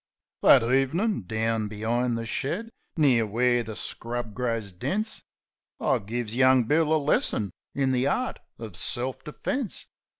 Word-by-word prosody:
That -, -, +7 dB
ev'nin', 135 Hz, -, +1 dB
down 110 Hz, 0 st, 0 dB
be'ind 115 Hz, +3 st, -1 dB
the 115 Hz, -, -4 dB
shed, 180 Hz, -, -2 dB, 0.3 s
near 125 Hz, -8 st, +4 dB
where 120 Hz, +3 st, +2 dB
the 110 Hz, -2 st, -6 dB
scrub 115 Hz, +4 st, -4 dB
grows 115 Hz, -4 st, -2 dB
dense, 205 Hz, -, -3 dB, 0.6 s
I -, -, +2 dB
gives 115 Hz, +2 st, -4 dB
young 130 Hz, 0 st, +5 dB
Bill 155 Hz, +6 st, +2 dB
a 160 Hz, -, +5 dB
lesson 140 Hz, -, +1 dB, 0.2 s
in 135 Hz, -1 st, +1 dB
the 130 Hz, +1 st, +2 dB
art 250 Hz, -, -1 dB, 0.2 s
uv 110 Hz, -5 st, -7 dB
self 130 Hz, +8 st, -2 dB
defence. 220 Hz, -, -3 dB
120 Hz, 140 wpm, -26 LUFS, 115-140 Hz, 0.6 s, That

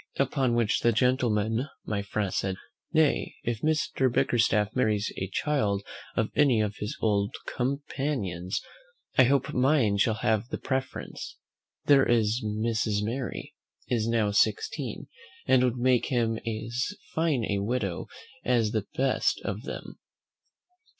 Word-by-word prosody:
Upon 135 Hz, -2 st, +1 dB
which 115 Hz, -2 st, +2 dB
the 120 Hz, -, +3 dB
gentleman, 115 Hz, 0 st, +1 dB, 0.2 s
my 105 Hz, -2 st, -1 dB
friend, 100 Hz, -1 st, -2 dB
said, 95 Hz, -1 st, -1 dB, 0.4 s
"Nay, 160 Hz, -3 st, +2 dB
if 115 Hz, -2 st, -2 dB
Mr. 150 Hz, -4 st, +1 dB
Bickerstaff 110 Hz, -3 st, +2 dB
marries 105 Hz, -5 st, +1 dB
a 95 Hz, -, -2 dB
child 105 Hz, -7 st, 0 dB, 0.3 s
of -, -, 0 dB
any 135 Hz, -6 st, +4 dB
of 105 Hz, -1 st, -1 dB
his 105 Hz, -, -4 dB
old 100 Hz, -2 st, +1 dB
companions, 125 Hz, -, -2 dB, 0.6 s
I 130 Hz, -, +9 dB
hope 140 Hz, +3 st, +1 dB
mine 125 Hz, -5 st, +3 dB
shall 110 Hz, +2 st, +2 dB
have 110 Hz, 0 st, 0 dB
the -, -, -3 dB
preference: 130 Hz, 0 st, -4 dB, 0.5 s
there 140 Hz, -2 st, +6 dB
is 115 Hz, 0 st, +2 dB
Mrs. 110 Hz, -1 st, 0 dB
Mary 120 Hz, +4 st, -4 dB, 0.4 s
is 115 Hz, -2 st, +1 dB
now 115 Hz, -3 st, +2 dB
sixteen, 435 Hz, -, 0 dB, 0.4 s
and 130 Hz, -1 st, +4 dB
would 125 Hz, -1 st, +1 dB
make 125 Hz, 0 st, +2 dB
him 115 Hz, -3 st, 0 dB
as 120 Hz, -, -2 dB, 0.2 s
fine 155 Hz, -8 st, +1 dB
a 100 Hz, -1 st, 0 dB
widow 100 Hz, -4 st, -2 dB, 0.4 s
as 115 Hz, -4 st, +2 dB
the 110 Hz, -2 st, -2 dB
best 135 Hz, 0 st, +2 dB
of -, -, -4 dB
them. -, -, -7 dB
115 Hz, 135 wpm, -28 LUFS, 105-130 Hz, 0.6 s, I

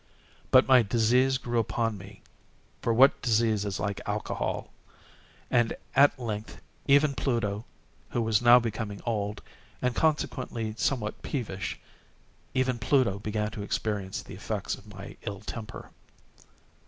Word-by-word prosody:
But -, -, +6 dB
my 130 Hz, -2 st, +7 dB
disease 120 Hz, +4 st, +3 dB
grew 120 Hz, -2 st, -1 dB
upon 115 Hz, 0 st, 0 dB
me—for 100 Hz, +3 st, -9 dB
what 130 Hz, +5 st, +5 dB
disease 110 Hz, -3 st, +2 dB
is 100 Hz, -1 st, -3 dB
like 100 Hz, -1 st, -2 dB
Alcohol!—and 120 Hz, -2 st, -3 dB, 0.2 s
at 140 Hz, +1 st, +6 dB
length 110 Hz, -3 st, -5 dB, 0.3 s
even 140 Hz, +1 st, +5 dB
Pluto, 115 Hz, -5 st, -1 dB, 0.4 s
who 120 Hz, -, -1 dB
was 110 Hz, 0 st, +2 dB
now 120 Hz, 0 st, +8 dB
becoming 110 Hz, -3 st, -3 dB
old, 105 Hz, -3 st, -2 dB, 0.4 s
and 125 Hz, -1 st, 0 dB
consequently 125 Hz, -6 st, -1 dB
somewhat 110 Hz, -2 st, -1 dB
peevish—even 125 Hz, +2 st, -5 dB
Pluto 115 Hz, -4 st, +2 dB
began 105 Hz, 0 st, -2 dB
to 105 Hz, -, -6 dB
experience 100 Hz, -2 st, -2 dB
the -, -, -11 dB
effects -, -, -3 dB
of 105 Hz, +1 st, -9 dB
my 95 Hz, 0 st, -10 dB
ill 100 Hz, -3 st, -5 dB
temper. 115 Hz, -1 st, -8 dB
115 Hz, 120 wpm, -28 LUFS, 105-125 Hz, 0.4 s, now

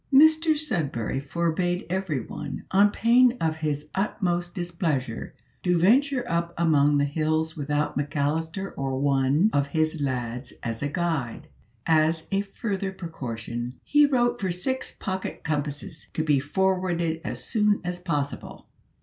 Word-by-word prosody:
Mr 315 Hz, +3 st, +6 dB
Sudberry 145 Hz, -, -2 dB
forbade 170 Hz, +4 st, -1 dB
everyone, 155 Hz, -6 st, -3 dB
on 200 Hz, +2 st, +6 dB
pain 245 Hz, +4 st, +4 dB
of 160 Hz, -1 st, 0 dB
his 150 Hz, -1 st, -2 dB
utmost 175 Hz, -3 st, -1 dB
displeasure, 165 Hz, -9 st, -2 dB, 0.3 s
to 180 Hz, -1 st, +2 dB
venture 250 Hz, +7 st, +3 dB
up 170 Hz, 0 st, -1 dB
among 150 Hz, -3 st, +4 dB
the 145 Hz, -, +3 dB
hills 155 Hz, +2 st, 0 dB
without 145 Hz, 0 st, -1 dB
McAllister 155 Hz, +6 st, -1 dB
or 135 Hz, -1 st, -2 dB
one 140 Hz, +7 st, +3 dB
of 140 Hz, 0 st, +2 dB
his 155 Hz, +1 st, 0 dB
lads 125 Hz, -2 st, -3 dB
as 115 Hz, -1 st, -3 dB
a 145 Hz, -, 0 dB
guide. 155 Hz, -8 st, -2 dB, 0.4 s
As 160 Hz, 0 st, +2 dB
a 195 Hz, 0 st, +2 dB
further 195 Hz, -1 st, -3 dB
precaution, 120 Hz, -8 st, -5 dB
he 295 Hz, 0 st, +5 dB
wrote 240 Hz, -3 st, +1 dB
for 190 Hz, -, 0 dB
six 255 Hz, +10 st, -2 dB
pocket 190 Hz, -2 st, -5 dB
compasses 150 Hz, 0 st, -3 dB
to 160 Hz, -, +1 dB
be 150 Hz, -3 st, +3 dB
forwarded 175 Hz, +1 st, 0 dB
as -, -, -4 dB
soon 210 Hz, -2 st, +2 dB
as 180 Hz, 0 st, -3 dB
possible. 150 Hz, -6 st, -3 dB
165 Hz, 135 wpm, -26 LUFS, 145-190 Hz, 0.4 s, Mr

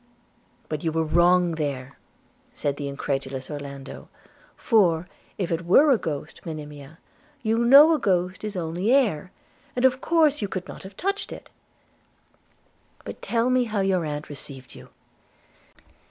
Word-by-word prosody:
'But 155 Hz, -1 st, -4 dB
you 165 Hz, -, 0 dB
were 160 Hz, +1 st, 0 dB
wrong 175 Hz, +2 st, +3 dB
there,' 140 Hz, -4 st, -4 dB, 0.6 s
said 140 Hz, -1 st, -2 dB
the 145 Hz, -, -4 dB
incredulous 135 Hz, -1 st, -4 dB
Orlando; 140 Hz, -2 st, -8 dB, 0.5 s
'for, 180 Hz, -7 st, +2 dB, 0.3 s
if 185 Hz, -4 st, -2 dB
it 165 Hz, +1 st, -1 dB
were 275 Hz, -, +5 dB
a 255 Hz, -, +5 dB
ghost, 150 Hz, 0 st, -5 dB
Monimia, 150 Hz, -2 st, -8 dB, 0.5 s
you 225 Hz, 0 st, +1 dB
know 280 Hz, +7 st, +8 dB
a 310 Hz, -, +1 dB
ghost 185 Hz, -4 st, 0 dB
is 210 Hz, -1 st, -4 dB
only 175 Hz, +5 st, -1 dB
air, 205 Hz, -, +2 dB, 0.4 s
and 250 Hz, +1 st, +2 dB
of 260 Hz, 0 st, +3 dB
course 310 Hz, -4 st, +3 dB
you 205 Hz, -, -1 dB
could 185 Hz, -1 st, -5 dB
not -, -, -9 dB
have 190 Hz, +1 st, -12 dB
touched 395 Hz, +2 st, -2 dB
it. -, -, -10 dB, 0.8 s
– -, -, -34 dB
But -, -, -8 dB
tell 235 Hz, +2 st, 0 dB
me 255 Hz, -1 st, +3 dB
how 215 Hz, -3 st, -1 dB
your 190 Hz, -2 st, +1 dB
aunt 150 Hz, -1 st, -4 dB
received 135 Hz, -2 st, -6 dB
you.' -, -, -13 dB
175 Hz, 155 wpm, -24 LUFS, 150-225 Hz, 0.8 s, know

